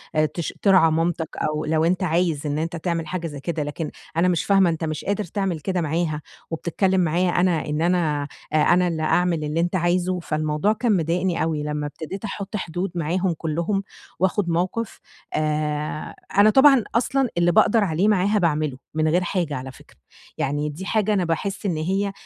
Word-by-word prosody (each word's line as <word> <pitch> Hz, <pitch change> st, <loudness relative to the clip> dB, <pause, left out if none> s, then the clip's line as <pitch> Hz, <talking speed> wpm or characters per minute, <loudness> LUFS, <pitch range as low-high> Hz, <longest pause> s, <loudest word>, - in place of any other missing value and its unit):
آآ 155 Hz, 0 st, +4 dB
تش 170 Hz, -, -3 dB
ترعى 185 Hz, -5 st, +5 dB
مامتك 165 Hz, 0 st, 0 dB
أو 155 Hz, 0 st, -1 dB
لو 160 Hz, +1 st, +2 dB
أنت 180 Hz, +2 st, +1 dB
عايز 165 Hz, -3 st, 0 dB
إن 145 Hz, +1 st, -1 dB
أنت 165 Hz, +2 st, -2 dB
تعمل 165 Hz, -1 st, -2 dB
حاجة 170 Hz, 0 st, -3 dB
زي 145 Hz, -2 st, -7 dB
كده 160 Hz, 0 st, -2 dB
لكن 150 Hz, +2 st, -4 dB, 0.3 s
أنا 180 Hz, +2 st, +4 dB
مش 175 Hz, -2 st, +1 dB
فاهمة 195 Hz, -3 st, +4 dB
أنت 165 Hz, 0 st, -3 dB
مش 155 Hz, -1 st, -3 dB
قادر 205 Hz, +1 st, 0 dB
تعمل 190 Hz, -2 st, -2 dB
كده 185 Hz, +2 st, -1 dB
معاها، 155 Hz, -1 st, -1 dB, 0.3 s
وبتتكلم 185 Hz, +3 st, +1 dB
معايا 175 Hz, +2 st, +1 dB
أنا 175 Hz, -2 st, +1 dB
إن 150 Hz, +1 st, -2 dB
أنا 160 Hz, -5 st, +1 dB, 0.3 s
آآ، -, -, +4 dB
أنا 180 Hz, +3 st, +4 dB
اللي 160 Hz, -2 st, -2 dB
أعمل 170 Hz, -1 st, +1 dB
اللي 150 Hz, +2 st, -1 dB
أنت 175 Hz, +2 st, 0 dB
عايزه" 180 Hz, +1 st, +1 dB
فالموضوع 155 Hz, +5 st, 0 dB
كان 220 Hz, -3 st, +1 dB
مضايقني 170 Hz, +2 st, 0 dB
أوي. 155 Hz, -2 st, -1 dB
لمّا 150 Hz, 0 st, -2 dB
ابتديت 165 Hz, +8 st, -7 dB
أحُط 200 Hz, +1 st, -5 dB
حدود 180 Hz, 0 st, -3 dB
معاهم 175 Hz, +2 st, 0 dB
كلهم، 170 Hz, +5 st, -1 dB, 0.4 s
وآخد 190 Hz, 0 st, +1 dB
موقف 185 Hz, +7 st, -1 dB, 0.3 s
آآ، 150 Hz, 0 st, -2 dB, 0.2 s
أنا 205 Hz, +1 st, +7 dB
طبعًا 270 Hz, -1 st, +6 dB
أصلًا 255 Hz, +2 st, +2 dB
اللي 175 Hz, 0 st, +4 dB
بأقدر 215 Hz, +5 st, +4 dB
عليه 180 Hz, +3 st, +1 dB
معاها 205 Hz, +1 st, +3 dB
بأعمله 155 Hz, -5 st, 0 dB, 0.2 s
من 155 Hz, 0 st, +1 dB
غير 175 Hz, +3 st, +2 dB
حاجة 175 Hz, -5 st, -1 dB
على 130 Hz, +1 st, -6 dB
فكرة، -, -, -19 dB, 0.4 s
يعني 145 Hz, +2 st, -1 dB
دي 170 Hz, +6 st, -7 dB
حاجة 215 Hz, -1 st, +2 dB
أنا 185 Hz, -3 st, +1 dB
باحس 195 Hz, +5 st, -2 dB
إن 170 Hz, -5 st, 0 dB
هي 195 Hz, +5 st, 0 dB
170 Hz, 185 wpm, -23 LUFS, 155-190 Hz, 0.4 s, أنا